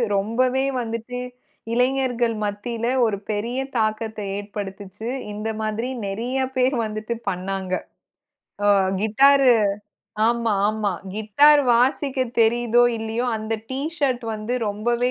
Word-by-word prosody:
ரொம்பவே 250 +6 +1 0.2
வந்துட்டு 230 +2 -5 0.6
இளைஞர்கள் 245 -2 +1
மத்தியில 225 +3 -3 0.2
ஒரு 200 -2 -2
பெரிய 230 +5 -2 0.2
தாக்கத்த 220 0 -1 0.2
ஏற்படுத்துச்சு. 205 +1 -6 0.2
இந்த 215 +2 -4
மாதிரி 220 +4 -2 0.2
நிறைய 235 +7 -3 0.2
பேர் 255 0 +2
வந்துட்டு 215 +2 -4 0.2
பண்ணாங்க. 185 0 -4 0.9
ஒ - - +4 0.3
கிட்டார் 275 +5 +5 0.8
ஆமா, 235 -1 +1 0.2
ஆமா 215 -2 0 0.2
கிட்டார் 285 +8 +5
வாசிக்க 265 +2 +1 0.2
தெரியுதோ, 235 +1 +3 0.2
இல்லையோ 225 +3 -2
அந்த 220 +1 -3 0.2
டீ 260 - -2 0.2
ஷர்ட் 255 -5 0
வந்து 215 +3 -3
ரொம்பவே 235 +4 0
230 Hz, 105 wpm, -23 LUFS, 215-250 Hz, 0.9 s, கிட்டார்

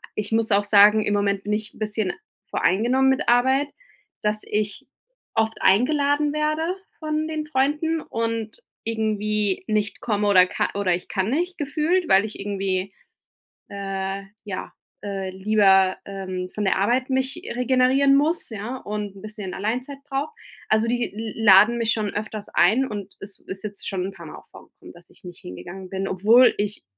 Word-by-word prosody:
Ich 210 +1 -3
muss 225 0 +1
auch 205 0 +3
sagen, 210 +1 +6
im 205 - 0
Moment 200 -1 0
bin 210 - -1
ich 210 0 -3
bisschen 210 -3 -1 0.4
voreingenommen 250 +7 +2
mit 265 - +1
Arbeit, 260 +4 +3 0.5
dass 210 0 0
ich 210 +6 -3 0.5
oft 225 0 0
eingeladen 285 +7 +3
werde 310 +3 0 0.2
von 310 0 -2
den 310 -1 -4
Freunden 300 +3 0
und 230 - -4 0.2
irgendwie 215 -3 -1
nicht 210 -1 -1
komme 210 -2 0
oder 185 -3 +6
ka - - -1
oder 200 -3 +1
ich 175 - -8
kann 190 0 -1
nicht 355 +5 -1
gefühlt, 315 +5 0
weil 195 +2 +5
ich 215 - -7
irgendwie, 195 -1 -2 0.8
äh, 195 0 -4 0.2
ja, 195 -3 -6 0.3
äh, 195 -2 -4
lieber, 190 -1 +3
ähm, 185 -2 -5
von 210 - -2
der 190 - +2
Arbeit 245 +7 +1
mich 265 +5 0
regenerieren 260 +2 +3
muss, 310 +3 +1
ja, 220 +4 -5
und 210 -3 -5
'n - - -12
bisschen 210 -3 -7
Alleinzeit 250 +7 -3
brauche. 275 +5 -2 0.4
Also, 220 +1 +3
die 240 -2 -1
l 220 +1 -5
laden 210 +3 +7
mich 230 -1 +1
schon 215 -2 -2
öfters 210 0 -5
ein 220 +10 +3
und 205 -2 -7
es 200 0 -11
ist 190 +2 -8
jetzt 205 -1 -6
schon 185 -2 -2
'n 195 - -5
paar 170 -3 -12
Mal - - -9
auch - - -16
vorgekommen, - - -15
dass 175 0 -17
ich - - -20
nicht 175 -1 -10
hingegangen 175 - -9
bin, 195 +1 -3
obwohl 220 +7 +5
ich 205 0 -3
215 Hz, 170 wpm, -23 LUFS, 195-260 Hz, 0.8 s, laden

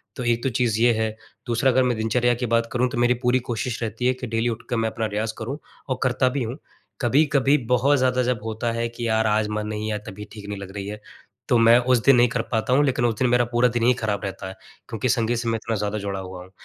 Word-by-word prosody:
तो 125 - -5
एक 120 -1 0
तो 135 - +1
चीज़ 115 -2 0
ये 120 -1 +5
है, 110 0 -1 0.3
दूसरा 120 +3 +2
अगर 130 +1 +3
मैं 125 -2 0
दिनचर्या 120 +2 +1
की 125 +1 -3
बात 115 0 +1
करूँ 125 +1 +1
तो 120 - -5
मेरी 120 +1 +3
पूरी 125 +1 +3
कोशिश 120 +2 -3
रहती 115 +2 -3
है 130 - +3
कि 130 0 -7
डेली 115 +1 0
उठ 115 -1 -5
के - - 0
मैं 115 -1 0
अपना 110 0 -3
रियाज़ 110 +1 -2
करूँ 125 +6 -4 0.3
और 130 -1 -1
करता 130 0 +2
भी 130 -1 -2
हूँ। 120 +4 -5 0.4
कभी-कभी 140 +2 +3 0.2
बहुत 140 +4 +3
ज़्यादा 130 -1 +2
जब 125 -2 0
होता 115 +1 -2
है 115 0 -2
कि 120 0 -5
यार 110 0 +2
आज 105 0 +1
मन 105 0 -3
नहीं 110 0 -3
या 105 - -1
तबीयत 105 +2 -9
ठीक 105 -2 -10
नहीं 100 -1 -5
लग 95 -1 -8
रही 100 0 -5
है। 105 +1 -7 0.5
तो 120 - +4
मैं 115 +1 +6
उस 125 0 +2
दिन 135 -2 +6
नहीं 120 0 +5
कर 120 -1 -1
पाता 115 +1 0
हूँ, 140 +3 +4
लेकिन 125 -3 +1
उस 115 -2 +1
दिन 130 - +3
मेरा 120 0 +3
पूरा 120 +1 +2
दिन 120 0 -1
ही 125 +2 +5
खराब 110 -4 -2
रहता 95 0 -5
है। 95 - -7 0.4
क्योंकि 115 +3 -2
संगीत 120 -1 +1
से 120 - -3
मैं 115 - 0
इतना 115 - -2
ज़्यादा 105 0 -2
जुड़ा 100 -1 -4
हुआ 95 -1 -8
हूँ। 95 - -17
115 Hz, 275 wpm, -23 LUFS, 110-125 Hz, 0.5 s, मैं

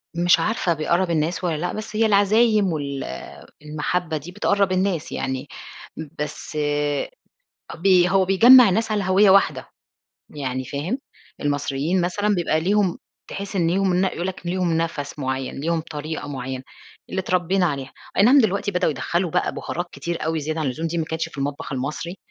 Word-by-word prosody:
مش 175 +1 +4
عارفة 210 -5 0
بيقرّب 170 +3 0
الناس 165 +2 -1
والّا 170 -3 0
لأ، 175 +4 -3
بس 215 0 -6
هي 225 +1 +3
العزايم 210 -1 +3
وال 140 -3 -3 0.6
المحبة 155 +2 -2
دي 155 +4 -9
بتقرّب 200 0 +1
الناس 185 -3 0
يعني، 130 +1 -3 0.7
بس 150 +1 -5 1.2
ب 175 +4 -2 0.2
هو 190 +1 +3
بيجمّع 235 +5 +8
الناس 220 +4 0
على 210 -2 0
هَوية 190 +2 +4
واحدة، 195 +1 +3 0.6
يعني 130 -3 -4
فاهم؟ 145 - -3 0.4
المصريين 145 +4 0
مثلًا 205 +4 0
بيبقى 170 -3 +1
ليهم 195 +1 +1 0.3
تحس 200 0 -5
إن 170 -3 +2
ليهم 190 0 +1
ن 180 +2 +2
يقول 180 -2 -2
لك 190 -2 -6
ليهم 175 -2 0
نَفَس 155 -3 -3
معيّن، 130 -1 -3
ليهم 165 +2 0
طريقة 155 -1 -6
معيّنة 130 -2 -5 0.5
اللي 190 - -1
اتربينا 185 0 +1
عليها، 140 -4 -4 0.2
أي - - +5
نعم 250 +7 +7
دلوقتي 200 -3 0
بدؤوا 180 -4 +1
يدخّلوا 170 +4 -1
بقى - - 0
بهارات 175 +1 -4
كتير 170 -2 -4
أوي 160 0 -1
زيادة 155 +2 -3
عن 155 - -1
اللزوم، 150 +6 -2
دي 170 +1 -2
ما 160 - 0
كانتش 160 +1 -3
في 155 - -13
المطبخ 140 +1 -4
المصري، 150 +7 -4
170 Hz, 165 wpm, -22 LUFS, 150-195 Hz, 1.2 s, بيجمّع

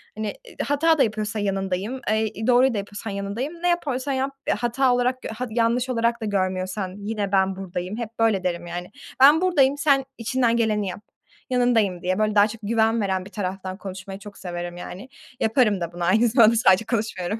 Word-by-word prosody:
Hani, 215 -1 -3
ııı, - - -9
hata 315 +3 +3
da 280 - +5
yapıyorsa 215 0 -2
yanındayım. 195 +4 -2
Eee, 220 0 -1
doğruyu 250 +1 +5
da 215 - -2
yapıyorsan 205 +1 -5
yanındayım. 200 +10 -4
Ne - - +2
yapıyorsan 285 -6 0
yap, 265 +1 -1 0.3
hata 245 +2 +2
olarak, 250 +1 0
gö - - -6
ha 230 +3 -4
yanlış 235 +3 +1
olarak 235 -1 0
da - - -2
görmüyorsan, 185 -1 -2
yine 205 -1 -3
ben 190 -1 +2
buradayım. 185 +1 -5
Hep 230 -1 -7
böyle 220 -5 +2
derim, 175 -1 -2
yani. 175 +2 -6 0.3
Ben 290 +5 +7
buradayım, 290 -7 +3
sen 280 -2 +3
içinden 235 0 +1
geleni 215 -3 +1
yap, 185 - -6 0.5
yanındayım 230 -8 +2
diye, 185 +2 -1
böyle 215 0 +1
daha 205 0 +6
çok 225 +1 -9
güven 225 +1 +2
veren 190 -2 -1
bir 200 - -12
taraftan 190 -1 -4
konuşmayı 195 -1 -8
çok 205 0 -11
severim, 175 -1 -6
yani. 190 +7 -8 0.3
Yaparım 220 -4 +2
da 170 - -3
bunu, 175 - -5
aynı 215 +7 +4
zamanda 230 -1 +5
sadece 205 -2 +4
konuşmuyorum. 210 -3 -2
215 Hz, 190 wpm, -23 LUFS, 195-245 Hz, 0.5 s, Ben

